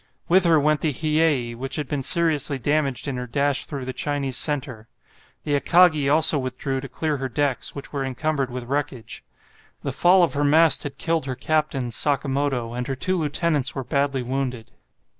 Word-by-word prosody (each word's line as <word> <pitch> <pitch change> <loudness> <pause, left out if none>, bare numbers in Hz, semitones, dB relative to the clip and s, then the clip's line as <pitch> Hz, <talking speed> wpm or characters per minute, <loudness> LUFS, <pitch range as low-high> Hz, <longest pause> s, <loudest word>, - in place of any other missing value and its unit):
With 185 +1 +4
her 165 -2 +5
went 150 0 +1
the 155 - +1
"Hiyei," 150 -4 0
which 135 +3 -4
had 150 -3 -3
been 145 0 -2
seriously 150 -2 +2
damaged 140 -1 -1
in 135 -2 -3
her 125 0 -5
dash 140 +3 +1
through 140 -4 -6
the 130 - -5
Chinese 140 -1 -2
centre. 130 -6 -1 0.6
The 145 - -2
"Akagi" 155 -1 +4
also 155 -1 +4
withdrew 130 +1 -3
to 135 - -8
clear 155 -2 -2
her 135 0 -4
decks, 140 0 -1
which 140 - -8
were 140 -1 -2
encumbered 135 +1 -2
with 125 0 -6
wreckage. 135 -2 -4 0.6
The - - -2
fall 180 +1 +4
of 170 - +1
her 145 0 0
mast 155 +2 +4
had 140 -1 -7
killed 165 -2 -1
her 130 - -3
captain, 140 -3 -1
Sakamoto, 135 -2 -1
and 125 +1 -4
her 135 - -2
two 185 +8 0
lieutenants 150 -3 0
were 135 - -3
badly 140 0 -1
wounded. 125 -2 -4
140 Hz, 185 wpm, -23 LUFS, 130-155 Hz, 0.6 s, her